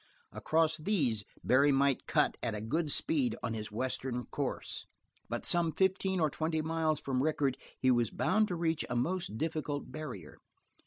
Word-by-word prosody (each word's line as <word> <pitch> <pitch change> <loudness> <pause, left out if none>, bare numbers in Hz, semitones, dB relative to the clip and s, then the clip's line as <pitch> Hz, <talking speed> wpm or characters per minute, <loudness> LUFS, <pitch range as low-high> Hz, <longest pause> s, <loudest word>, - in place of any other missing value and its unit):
Across 160 0 +1
these 145 - +1 0.2
Barry 140 +3 +5
might 140 -1 +2
cut - - +2
at 115 -3 -1
a - - -3
good 150 +8 -1
speed 280 - +2
on 120 -2 -1
his 110 -2 -5
western 125 +1 -2
course, 140 -3 -3 0.4
but - - -3
some 170 -2 +3
fifteen 190 +1 +1
or 155 -3 +2
twenty 160 +1 -1
miles 160 -1 0
from 130 -2 -1
Rickett 145 -3 +1 0.2
he 130 - +4
was 120 -3 +2
bound 215 0 +2
to 180 - -2
reach 165 -2 0
a 125 - -2
most 165 - -1
difficult 150 -3 -3
barrier. 125 - -7
150 Hz, 165 wpm, -32 LUFS, 125-165 Hz, 0.4 s, Barry